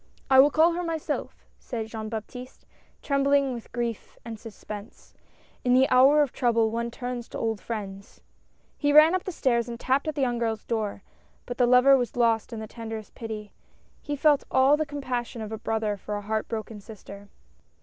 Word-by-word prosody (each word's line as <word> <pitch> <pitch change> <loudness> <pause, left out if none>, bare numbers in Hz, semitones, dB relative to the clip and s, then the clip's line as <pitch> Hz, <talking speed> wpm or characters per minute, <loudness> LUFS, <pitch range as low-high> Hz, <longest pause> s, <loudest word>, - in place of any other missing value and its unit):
"I 265 - +7
will 280 +2 +8
call 320 +3 +4
her, 345 +1 -2
myself," 330 -3 -4
said 230 -4 -5
Jean 220 -1 -6
Baptiste, 250 +3 -8 0.4
tremb 275 -1 +1
ling 280 -1 +3
with 235 -2 -9
grief 235 -2 -4
and 225 -2 -7
suspense. 210 -1 -10 0.3
" - - -33
In 250 0 +3
the 265 +1 +5
hour 275 +4 +6
of 275 - -3
trouble 230 -3 +2
one 235 +1 -2
turns 245 0 -6
to - - -7
old 225 -3 -2
friends! 200 -3 -7 0.3
" - - -40
He 290 -1 +2
ran 305 +3 +7
up 370 - -1
the 375 - -3
stairs 240 -7 0
and 235 0 -6
tapped 265 +4 0
at 310 - -2
the 290 - -2
young 245 -2 0
girl's 225 -2 -2
door 215 -4 -3 0.2
— - - -37
but 245 0 -7
the 245 - +4
lover 250 +2 +6
was 245 -3 -1
lost 230 -1 +1
in 225 - -5
the 220 - -5
tenderest 225 -1 -8
pity 215 -2 -7 0.2
— - - -36
he 290 - -4
felt 290 0 +3
all 265 +2 +5
the 310 0 -2
compassion 255 -4 -4
of 215 - -7
a 220 - -5
brother 220 -2 -1
for 210 +2 -5
a 205 - -4
heart 215 +1 -2
broken 220 -1 -5
sister. 200 -1 -12
235 Hz, 210 wpm, -26 LUFS, 220-270 Hz, 0.4 s, will